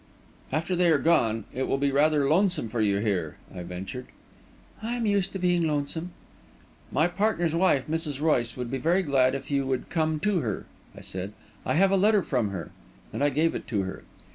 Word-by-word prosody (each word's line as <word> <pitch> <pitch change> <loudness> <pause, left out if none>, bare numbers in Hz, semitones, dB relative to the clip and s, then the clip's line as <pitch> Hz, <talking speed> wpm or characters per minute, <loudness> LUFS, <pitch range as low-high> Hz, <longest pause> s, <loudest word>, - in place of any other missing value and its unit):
"After 160 +6 0
they 175 -1 +3
are 160 - +5
gone, 115 -8 +2
it 130 +1 -2
will - - +1
be 140 0 +1
rather 145 0 +3
lonesome 180 - +2
for 115 +1 -1
you 100 -2 +2
here," 100 -7 -1 0.2
I 90 - -6
ventured. 95 +8 -6 0.7
"I 230 +2 -2
am 235 -2 -1
used 200 -2 +1
to - - -2
being 175 -2 +2
lonesome." 155 +3 -2 0.8
"My 155 +5 +3
partner's 175 -3 0
wife, 165 -6 +3
Mrs. 155 -3 -2
Royce, 130 -7 +1
would 125 -1 -4
be 135 - -2
very 175 +8 +2
glad 135 -4 +3
if 135 - -6
you 140 -1 +1
would 130 -2 -2
come 160 -2 0
to 200 -1 +2
her," 110 - -3 0.3
I - - -9
said. 95 +2 -5 0.3
"I - - +1
have 190 +3 +4
a 195 - +4
letter 205 0 +4
from 125 -8 0
her," 90 -5 -6 0.4
and - - -1
I 145 - +4
gave 155 +4 +1
it - - -6
to 105 -5 0
her. 95 - -6
145 Hz, 205 wpm, -27 LUFS, 125-175 Hz, 0.8 s, are